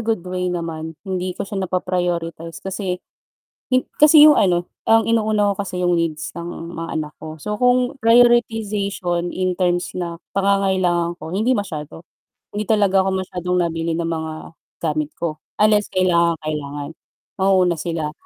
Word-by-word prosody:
good 220 -5 -1
way 180 0 -2
naman, 165 -2 -4
hindi 185 -1 -3
ko - - -3
siya 195 -1 -4
napa-prioritize 175 -3 -2
kasi 190 -1 -3 0.7
hin 255 0 +2 0.2
kasi 300 0 +9
yung 305 - +9
ano, 175 -2 +2 0.2
ang 225 -1 +5
inuuna 215 -2 +2
ko 200 - -5
kasi 180 -2 -3
yung 175 - +3
needs 160 -2 -3
ng 170 0 -7
mga 165 0 -5
anak 150 -1 -3
ko. 155 0 -7
So, 210 - -5
kung 250 +2 +2
prioritization 215 -6 +2
in 185 0 -1
terms 175 -1 +1
na 170 -2 -4 0.2
pangangailangan 190 -3 +1
ko, 160 - -7
hindi 215 +8 +1
masyado, 165 - -4 0.5
Hindi 210 0 -3
talaga 195 -3 +3
ako - - +1
masyadong 180 0 -2
nabili 165 -1 -1
ng 165 0 -2
mga 160 -1 -3 0.5
gamit 155 -1 -1
ko 155 -3 -4 0.2
unless 210 -1 +4
kailangang 170 -2 +2
kailangan, 145 -2 -4 0.5
mauuna 185 -3 +3
sila. 165 -3 -3
180 Hz, 150 wpm, -20 LUFS, 165-205 Hz, 0.7 s, kasi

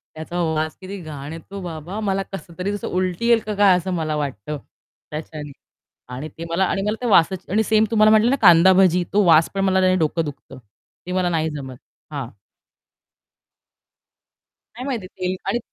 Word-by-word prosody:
त्याचा 170 +3 -4
वास 155 0 -2
किती 195 +2 -7
घाण 150 -1 -7
येतो 190 +4 -9
बाबा 175 +4 -6
मला 195 -2 -1
कसतरी 180 +2 -5 0.2
उलटी 185 +4 -1
येईल 235 -1 +5
का 210 -1 -3
काय 200 -2 +5
असं 180 +1 -3
मला 155 -3 -1
वाटतं 145 -2 -4 0.5
त्याच्याने 150 -1 -7 0.6
आणि 145 +5 -6
ते 165 - -5
मला 175 +3 +2
आणि 195 +1 -1
मला 210 +2 -1
ते - - -1
वासाची 190 -2 +3
आणि 220 +1 +3
सेम 215 0 +3
तुम्हाला 215 -1 +5
म्हटलं 220 +2 +5
ना, 275 - +2
कांदा 175 0 +7
भाजी 180 -2 +4
तो 205 0 +3
वास 160 -1 +5
पण 195 - -1
मला 190 -1 +3
त्याने 185 0 +3
डोकं 160 0 0
दुखतं. 135 -2 -9 0.5
ते 180 - -4
मला 185 -1 +1
नाही 160 -2 0
जमत. 135 -4 -7 0.4
हां. 140 -5 -4 2.5
नाही 250 - -6
माहिती 235 -9 -3
तेल 185 0 -2
आणि 240 - 0
180 Hz, 175 wpm, -21 LUFS, 155-195 Hz, 2.5 s, कांदा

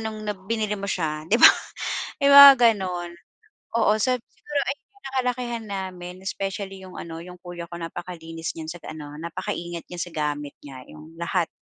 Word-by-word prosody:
no'ng 220 -1 -5
na 210 - 0
binili 210 +2 -2
mo 195 - -5
siya 155 -4 -2
'di 225 - +4
ba - - +12 0.7
may 280 - +5
mga 280 0 +13 0.2
gano'n. 180 -3 -4 0.7
Oo, 215 -1 +4
sab 250 +3 +1
siguro 295 -1 -3
ay 275 - -3 0.3
nakalakihan 250 -3 -2
namin, 185 -2 -6
especially 195 -1 -4
'yong 185 - -11
ano, 165 -1 -7
'yong 180 0 -11
kuya 175 -1 -7
ko - - -4
napakalinis 165 -1 -6
niyan 160 -1 -7
sa 175 - -7
ano 150 -2 -8
napakaingat 170 0 -5
niya 175 - -8
sa 175 0 -3
gamit 145 -1 -2
niya. 130 -3 -10
'Yong 155 +2 -13
lahat, 170 0 0
180 Hz, 170 wpm, -24 LUFS, 165-210 Hz, 0.7 s, mga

